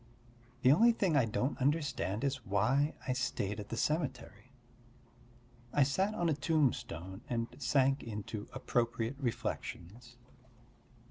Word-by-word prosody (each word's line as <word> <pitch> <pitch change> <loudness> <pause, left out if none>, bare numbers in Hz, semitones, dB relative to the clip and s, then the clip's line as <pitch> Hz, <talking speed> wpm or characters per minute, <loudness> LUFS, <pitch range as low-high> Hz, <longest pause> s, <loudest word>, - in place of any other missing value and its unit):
The 130 - +7
only 230 +10 +6
thing 190 -8 +1
I 135 -4 +5
don't 125 +5 -1
understand 140 - 0
is 135 -3 -1
why 115 +9 +2
I 130 - +2
stayed 105 -5 -2
at 105 - -7
the 115 - -4
cemetery; 130 -6 -2 1.2
I 145 - +4
sat 190 +10 +1
on 175 - 0
a 160 - +3
tombstone 125 - -1
and 115 -2 0
sank 135 0 +2
into 105 -1 -6
appropriate 120 -1 -1
reflections. 120 -2 -4
130 Hz, 125 wpm, -33 LUFS, 110-145 Hz, 1.2 s, The